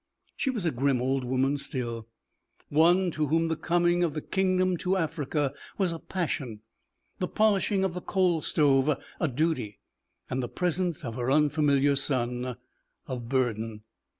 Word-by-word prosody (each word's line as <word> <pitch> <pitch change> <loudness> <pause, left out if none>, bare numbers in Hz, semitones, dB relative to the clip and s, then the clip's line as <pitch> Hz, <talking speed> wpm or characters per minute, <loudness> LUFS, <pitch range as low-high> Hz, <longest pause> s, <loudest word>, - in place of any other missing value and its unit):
She - - -1
was 225 -8 -2
a 165 - +2
grim 135 0 +1
old 130 +1 0
woman 130 +3 +1
still, 120 -5 -4 0.6
one 175 +4 +4
to 155 -1 -1
whom 165 +3 +2
the 160 - 0
coming 175 +1 +2
of 160 -3 0
the 155 - -2
kingdom 185 -1 +1
to 185 +3 0
Africa 150 -4 -1 0.2
was 185 -4 +1
a 165 - -6
passion, 140 - -3 0.6
the 180 - 0
polishing 205 -2 +2
of 190 -2 0
the 180 - -5
coal 180 -4 +1
stove 145 -1 +3 0.2
a - - +1
duty, 145 -6 -1 0.5
and 130 - -2
the 120 - -4
presence 175 -3 -1
of 115 - -4
her 125 0 -1
unfamiliar 145 -1 +3
son 125 -2 -1 0.5
a 130 - -4
burden. 115 -3 -2
150 Hz, 155 wpm, -28 LUFS, 130-175 Hz, 0.6 s, one